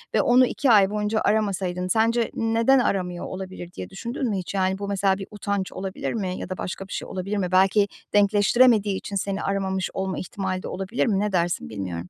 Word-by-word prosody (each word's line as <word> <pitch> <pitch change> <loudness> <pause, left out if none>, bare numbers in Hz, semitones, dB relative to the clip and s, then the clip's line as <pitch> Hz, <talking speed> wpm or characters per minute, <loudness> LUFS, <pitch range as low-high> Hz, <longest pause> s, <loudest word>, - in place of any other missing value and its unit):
ve - - +5
onu 250 +1 +5
2 260 +1 +1
ay 200 -3 +6
boyunca 210 +1 -1
aramasaydın 190 -4 0
sence, 230 +4 +2
"Neden 230 +4 +3
aramıyor 180 -6 -1
olabilir?" 185 -2 -7
diye - - -7
düşündün 235 +6 -4
mü 205 - -1
hiç, 185 0 -5
yani, 190 -1 +1
bu, 200 - -4
mesela, 195 -1 +1
bir 195 - -7
utanç 200 -2 -3
olabilir 190 0 -4
mi 190 -5 -2
ya - - -6
da 185 - -4
başka 190 +1 -5
bir - - -8
şey - - -4
olabilir 195 +3 -3
mi? 185 -2 -1
Belki 195 +2 +4 0.3
denkleştiremediği 205 +1 +4
için 200 - -6
seni 195 0 -2
aramamış 190 -1 -1
olma 190 0 -2
ihtimali 185 0 -4
de - - -5
olabilir 195 +5 -2
mi? 205 -6 +1
Ne 210 +1 0
dersin 170 - 0
bilmiyorum. 90 -2 -5
195 Hz, 205 wpm, -24 LUFS, 185-210 Hz, 0.3 s, ay